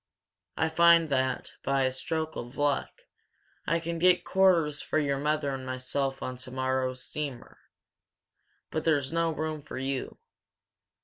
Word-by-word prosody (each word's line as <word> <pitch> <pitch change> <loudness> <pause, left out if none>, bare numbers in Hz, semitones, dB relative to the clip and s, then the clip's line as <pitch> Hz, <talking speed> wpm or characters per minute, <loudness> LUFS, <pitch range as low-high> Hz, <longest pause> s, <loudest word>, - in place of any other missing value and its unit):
I 160 - +2
find 170 0 +5
that, 130 -2 0
by 135 0 +1
a 130 - +2
stroke 160 +4 -3
of 120 +3 -7
luck, 145 -1 -1 0.6
I 165 +2 +2
can 170 0 -4
get 180 +1 +4
quarters 170 -6 +3
for - - -1
your 140 -2 +1
mother 150 -1 0
and 130 -1 -5
myself 130 +1 -2
on 130 0 -4
tomorrow's 130 0 -2
steamer. 140 -5 -6 1.1
But 160 - -2
there's 145 -3 +1
no 165 0 +2
room 155 -1 -3
for 140 - -8
you. 135 0 -3
145 Hz, 140 wpm, -29 LUFS, 130-160 Hz, 1.1 s, find